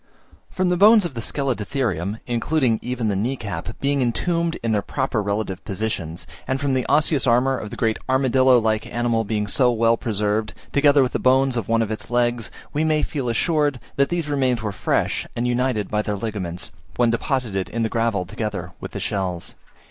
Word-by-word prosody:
From 185 -1 0
the 180 - +2
bones 210 +1 +7
of 170 - -3
the 115 - -4
Scelidotherium, 110 - -2
including 120 0 +1
even 125 -2 -2
the 100 - 0
knee 115 +8 0
cap, 100 -3 -6
being 140 0 +1
intombed 165 +7 0
in 115 - 0
their 105 -2 +2
proper 120 +1 -1
relative 100 -2 -2
positions, 95 -5 -4 0.2
and 130 +1 0
from 140 -1 0
the 130 -2 0
osseous 150 -3 +3
armour 125 +3 +3
of 105 - -5
the - - -7
great 110 -2 0
armadillo 130 -1 +4
like 110 0 0
animal 120 -1 0
being 105 0 -1
so 125 +5 +3
well 115 0 +3
preserved, 105 -1 -1 0.2
together 145 -1 +5
with 125 - -1
the - - -1
bones 130 0 +3
of 115 -5 -2
one 115 0 +2
of 110 - -4
its 110 - -5
legs, 120 -1 +1 0.2
we 150 - +1
may 155 -1 +2
feel 135 -5 -2
assured 145 +1 +1 0.2
that 140 0 +2
these 170 -3 -1
remains 130 -5 +1
were 105 - -1
fresh 100 - -1
and 120 +1 0
united 125 -4 0
by 105 - +2
their 105 -1 -2
ligaments, 95 -5 -4 0.2
when 120 -2 +3
deposited 115 -6 -1
in 115 0 -2
the - - +2
gravel 115 -5 0
together 105 +4 -4
with - - -8
the - - -4
shells. 90 -4 -2
120 Hz, 195 wpm, -22 LUFS, 105-135 Hz, 0.2 s, bones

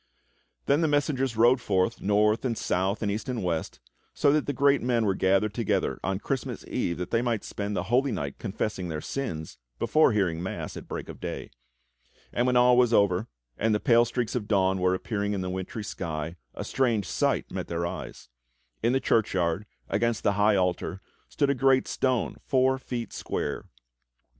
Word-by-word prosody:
Then 145 +3 +3
the 160 - +3
messengers 140 -5 0
rode 120 +3 +5
forth, 95 +1 0
north 105 +2 +2
and 120 -4 -1
south 95 +4 0
and 100 - 0
east 110 +5 -4
and 120 -5 -2
west, 85 -3 -2 0.4
so 140 - +4
that 150 -1 +1
the - - +1
great 140 -1 +3
men 120 -2 +1
were 100 - +2
gathered 95 +3 +2
togetlier 115 -3 0
on 95 -1 0
Christmas 130 +5 -4
Eve 85 - -2
that 90 0 -5
they 115 - +2
might 120 -3 -1
spend 105 0 -4
the - - 0
Holy 130 +3 +2
Night 70 -9 -4
confessing 95 -2 -3
their 80 -1 -3
sins 80 - -5 0.2
before 155 - +4
hearing 90 -6 0
mass 95 - -5
at - - -8
break - - -5
of - - -9
day; - - -5 0.8
and 120 +1 +1
when 125 - +2
all 125 0 +6
was 125 -2 +4
over, 100 -1 +3 0.3
and 110 -1 +2
the - - +1
pale 120 +1 +5
streaks 120 0 -2
of 115 -5 -2
dawn 95 -2 +2
were 90 0 +2
appearing 105 +1 -2
in 100 - -2
the 90 0 -3
wintry 95 +4 -4
sky, 80 -4 -4 0.2
a - - -4
strange 120 -7 0
sight - - 0
met - - -4
their 85 0 -2
eyes: 85 - -6 0.5
In 120 - +2
the 135 - +3
churchyard, 95 -5 +1 0.2
against 115 +1 0
the 100 - +3
high 105 +1 +3
altar, 90 0 0 0.3
stood 140 -2 +1
a - - +3
great 135 0 +3
stone 130 -3 0
four 130 0 +2
feet 120 -4 -5
square. - - -3
110 Hz, 190 wpm, -27 LUFS, 95-125 Hz, 0.8 s, all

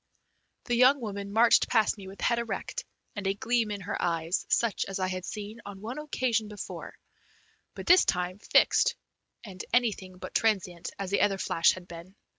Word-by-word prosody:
The 245 - -2
young 255 +4 +5
woman 200 -3 -5
marched 230 +3 +5
past 220 -3 +3
me 195 -3 -11
with 195 +1 -11
head 235 -1 +2
erect, 485 - -4 0.3
and 205 -2 -3
a 195 - +1
gleam 230 +1 0
in 205 -1 -4
her 195 - -4
eyes 165 0 -1
such 230 -3 +1
as 195 - -4
I 185 -1 0
had 185 -1 -4
seen 215 +2 -7
on 200 -1 -9
one 230 +8 -6
occasion 250 -7 -1
before, 210 -1 -8 0.8
but - - -7
this 360 +1 +7
time 180 +1 -1
fixed 485 - +3 0.5
and 190 -4 -8
anything 205 -6 0
but - - -8
transient, 185 -6 0
as 195 -1 -5
the 200 - +2
other 200 -1 +2
flash 165 -2 +3
had 180 -1 -10
been. 175 +3 -11
205 Hz, 185 wpm, -28 LUFS, 185-235 Hz, 0.8 s, this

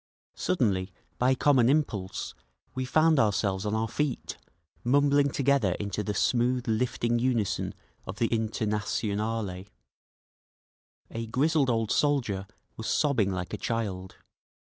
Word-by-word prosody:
Suddenly, 100 - 0 0.3
by 130 +2 +3
common 130 -3 +4
impulse, 105 -11 -1 0.4
we 130 0 -2
found 155 +3 +3
ourselves 100 -2 +1
on 105 - 0
our 110 +1 0
feet, 135 +3 -2 0.5
mumbling 140 +2 +3
together 135 -8 +2
into 100 +2 -3
the 105 +1 -3
smooth 125 +3 +1
lifting 120 +1 0
unison 120 -5 0 0.3
of 95 - -6
the 120 - +2
Internationale. 105 -2 -2 1.5
A 115 0 -4
grizzled 140 +3 +2
old 115 -2 0
soldier 120 -10 +1 0.3
was 110 - -5
sobbing 130 -10 +2
like 90 -1 -4
a - - -2
child. 100 -5 -3
115 Hz, 120 wpm, -28 LUFS, 100-130 Hz, 1.5 s, common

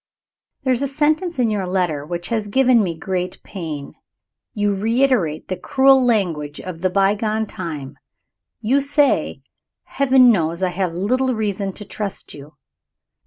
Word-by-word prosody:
There 260 -1 +2
is 250 - -2
a 280 - 0
sentence 305 +4 0
in 240 -3 +2
your 200 -3 -2
letter 180 -6 -1
which 175 +2 -5
has 220 -3 -1
given 250 +2 +4
me 170 -5 -2
great 180 0 -3
pain. 155 -7 -6 0.6
You 205 -1 +1
reiterate 220 - +1
the 185 - -2
cruel 265 +7 +4
language 170 -11 0
of 175 -3 -7
the 185 - +2
bygone 210 +3 +1
time. 160 -10 -7 0.6
You 255 +6 +2
say, 285 +1 +1 0.4
"Heaven 260 -3 +4
knows 170 -3 0
I 185 - +2
have 180 -1 -2
little 255 +7 0
reason 200 -2 -2
to 210 - -8
trust 200 0 -5
you." 145 +1 -12
205 Hz, 150 wpm, -20 LUFS, 175-255 Hz, 0.6 s, given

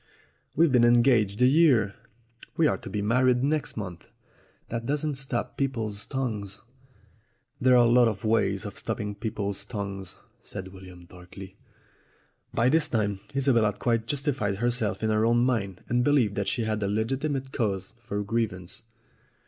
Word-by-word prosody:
"We've 165 0 +4
been 125 -2 +4
engaged 120 -3 +4
a - - +7
year. 130 -8 +4 0.6
We 165 - +4
are - - +1
to - - -9
be 100 +1 -3
married 125 +3 +3
next 150 -2 -1
month." 95 -5 -7 0.6
"That 115 0 -4
doesn't 150 +1 0
stop 135 -3 -3
people's 115 -7 -2
tongues." 105 -7 -3 1.0
"There 125 0 +5
are 120 - +6
lots 120 0 +5
of 105 0 -6
ways 105 -2 +1
of 105 - -7
stopping 105 -2 -3
people's 100 -2 -3
tongues," 100 -3 -5 0.3
said 95 -2 -7
William 90 -2 -13
darkly. 95 +2 -12 1.0
By 115 - +2
this 155 +2 +3
time 105 -4 0 0.2
Isobel 135 -4 +3
had 105 -1 -1
quite 115 -2 0
justified 135 -8 -1
herself 115 -1 -1
in 110 - +1
her 110 0 +2
own 120 +1 +3
mind 100 -7 -1
and 120 +1 +1
believed 130 -7 +3
that 100 0 -2
she 120 - 0
had 110 -1 -2
a 100 - 0
legitimate 130 +6 -2
cause 100 -6 -2
for 105 -3 -4
grievance. 105 -3 -3
115 Hz, 155 wpm, -27 LUFS, 100-125 Hz, 1.0 s, a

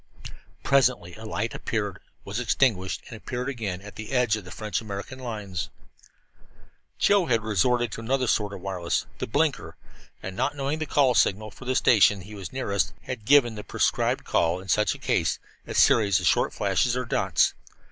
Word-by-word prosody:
Presently 125 -10 +2
a 110 - -10
light 110 +1 -2
appeared, 105 -4 -3 0.3
was 105 +3 -3
extinguished 115 -6 +1
and 115 - -8
appeared 125 +3 -5
again, 105 -9 -4
at 105 - -11
the 110 +2 -7
edge 125 -4 +3
of 110 - -6
the 100 +3 -8
American 105 +4 -7
French - - -10
lines. 105 -6 -4 1.3
Joe 200 -3 +3
had 115 -3 +1
resorted 120 +3 +1
to 115 - -6
another 130 +3 0
sort 105 -3 +1
of 100 -2 -8
wireless 90 -3 -2
the - - -3
"blinker" 125 - 0 0.5
and, 95 0 -5
not 130 +6 0
knowing 140 +2 -2
the 155 - -3
call 135 -2 +3
signal 105 -1 +2
for 130 - -13
the 130 +1 0
station 105 -5 +5
he 90 +4 -11
was 95 -5 -7
nearest, 100 -7 -1
had 125 -5 -6
given 130 -3 +5
the 105 -1 -7
prescribed - - 0
call 85 +2 +1
in 95 +1 -11
such 105 0 +2
a - - -9
case, - - 0 0.3
a - - -5
series 100 -3 +5
of 90 - -4
short - - +3
flashes, 125 0 +1
or 125 - -2
dots. - - +2
110 Hz, 185 wpm, -26 LUFS, 100-125 Hz, 1.3 s, station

